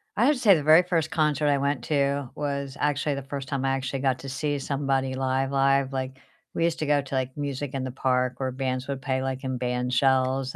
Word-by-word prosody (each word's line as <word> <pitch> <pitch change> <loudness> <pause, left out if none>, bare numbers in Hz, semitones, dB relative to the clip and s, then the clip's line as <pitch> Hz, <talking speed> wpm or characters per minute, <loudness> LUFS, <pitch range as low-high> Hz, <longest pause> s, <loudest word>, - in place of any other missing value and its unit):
I 230 - +3
have 295 +2 +4
to - - -6
say 205 -6 +6
the 150 - -1
very 155 +3 +7
first 165 -3 -1
concert 150 -1 +1
I 140 -1 +3
went 140 -2 -1
to 140 -3 0
was 140 -2 -3
actually 145 0 0
the 140 - -4
first 135 -1 -6
time 135 -1 -2
I - - +2
actually 135 0 -2
got 130 -1 +1
to 135 - -7
see 145 +2 -1
somebody 135 -1 -1
live 135 +1 0
live, 135 0 +2
like, 130 0 -3 0.4
we 165 - 0
used 170 -1 0
to 155 - -1
go 145 -1 +3
to, 135 0 -5
like, 130 0 -2
music 140 -1 -4
in 135 - -2
the 130 - -4
park 125 -1 0
where 130 -1 -1
bands 130 0 -3
would 140 -1 -3
pay, 130 -2 -1
like, 130 0 -3
in 130 -1 -2
band 125 0 -1
shells, 130 0 +2
135 Hz, 245 wpm, -26 LUFS, 130-145 Hz, 0.4 s, very